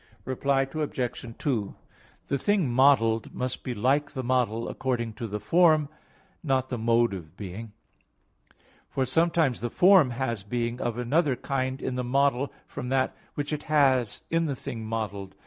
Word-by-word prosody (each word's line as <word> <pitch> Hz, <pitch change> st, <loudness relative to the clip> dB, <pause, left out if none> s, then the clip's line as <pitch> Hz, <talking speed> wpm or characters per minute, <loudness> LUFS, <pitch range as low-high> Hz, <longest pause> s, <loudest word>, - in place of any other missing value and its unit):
Reply 135 Hz, +1 st, +1 dB
Obj. 130 Hz, -5 st, -4 dB
2: 115 Hz, -9 st, -2 dB, 0.5 s
The 140 Hz, -, -1 dB
thing 195 Hz, -6 st, +1 dB
modelled 120 Hz, -4 st, +3 dB
must 125 Hz, 0 st, -3 dB
be 125 Hz, -, -4 dB
like 135 Hz, +6 st, +1 dB
the 130 Hz, -2 st, -4 dB
model 120 Hz, -3 st, 0 dB
according 120 Hz, -4 st, -2 dB
to 115 Hz, +1 st, -5 dB
the 105 Hz, 0 st, -4 dB
form, 155 Hz, -, +4 dB, 0.5 s
not 130 Hz, -4 st, 0 dB
the 125 Hz, -, -3 dB
mode 115 Hz, -1 st, +3 dB
of 85 Hz, -2 st, -9 dB
being. 105 Hz, +2 st, -7 dB, 1.2 s
For 135 Hz, -2 st, 0 dB
sometimes 160 Hz, -2 st, +2 dB
the 120 Hz, -, -2 dB
form 180 Hz, -, +6 dB
has 120 Hz, -3 st, -2 dB
being 120 Hz, +4 st, -3 dB
of 120 Hz, -1 st, -2 dB
another 135 Hz, +3 st, +1 dB
kind 130 Hz, +1 st, -2 dB
in -, -, -2 dB
the 125 Hz, -, -1 dB
model 140 Hz, +1 st, +1 dB
from 125 Hz, -3 st, -6 dB
that 130 Hz, 0 st, +1 dB, 0.2 s
which 145 Hz, +1 st, -3 dB
it 150 Hz, -, -2 dB
has 135 Hz, -6 st, +2 dB
in 165 Hz, 0 st, +2 dB
the 140 Hz, -, -2 dB
thing 115 Hz, -2 st, -6 dB
modelled. 100 Hz, -4 st, -4 dB
130 Hz, 160 wpm, -27 LUFS, 115-140 Hz, 1.2 s, form